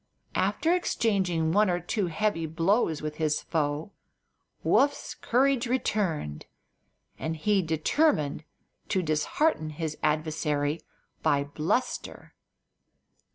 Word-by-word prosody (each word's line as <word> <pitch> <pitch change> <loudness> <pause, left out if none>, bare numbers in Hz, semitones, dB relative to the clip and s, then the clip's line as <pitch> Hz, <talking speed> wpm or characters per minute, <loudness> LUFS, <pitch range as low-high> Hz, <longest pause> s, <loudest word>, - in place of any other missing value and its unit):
After 330 +2 +1
exchanging 190 - +1
one 205 +2 +4
or 175 0 +1
two 180 +3 -1
heavy 170 -1 0
blows 165 0 +1
with 150 0 -4
his 155 -2 +1
foe 150 +2 -1 0.7
Woof's 285 +1 +2
courage 255 0 +2
returned, 185 - -1 0.7
and 160 0 -3
he 200 +5 +2
determined 160 - +1 0.5
to 190 -2 +1
dishearten 155 - +1
his 155 0 -4
adversary 150 -1 0 0.4
by 140 0 +2
bluster. 155 - -2
165 Hz, 100 wpm, -28 LUFS, 155-210 Hz, 0.7 s, one